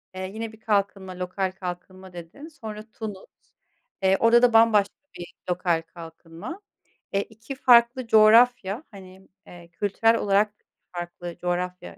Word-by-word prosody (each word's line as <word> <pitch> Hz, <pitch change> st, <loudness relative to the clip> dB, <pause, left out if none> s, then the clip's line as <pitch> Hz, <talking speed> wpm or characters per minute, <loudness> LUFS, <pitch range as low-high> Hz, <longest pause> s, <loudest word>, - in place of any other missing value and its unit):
eee, 185 Hz, 0 st, -5 dB
yine 225 Hz, 0 st, -5 dB
bir 220 Hz, -, -17 dB
kalkınma, 195 Hz, -3 st, -2 dB
lokal 185 Hz, +1 st, -2 dB
kalkınma 185 Hz, 0 st, -8 dB
dedin, 175 Hz, -, -10 dB
sonra 220 Hz, -9 st, -9 dB
Tunus, 210 Hz, -3 st, -7 dB, 0.8 s
eee, 190 Hz, 0 st, +4 dB
orada 230 Hz, +1 st, +5 dB
da 245 Hz, -1 st, +4 dB
bambaşka 220 Hz, -3 st, +4 dB, 0.2 s
bir 175 Hz, -1 st, -9 dB, 0.2 s
lokal 175 Hz, -2 st, 0 dB
kalkınma. 165 Hz, -, -11 dB, 0.5 s
Eee, 200 Hz, -, +2 dB
2 225 Hz, +5 st, -10 dB
farklı 245 Hz, -1 st, +4 dB
coğrafya, 225 Hz, +1 st, +4 dB
hani, 190 Hz, -1 st, -14 dB, 0.2 s
eee, 175 Hz, -1 st, -14 dB
kültürel 210 Hz, +5 st, +1 dB
olarak 205 Hz, 0 st, +1 dB, 0.4 s
farklı 175 Hz, -1 st, -7 dB
coğrafya 180 Hz, -, -4 dB
195 Hz, 130 wpm, -24 LUFS, 180-225 Hz, 0.8 s, orada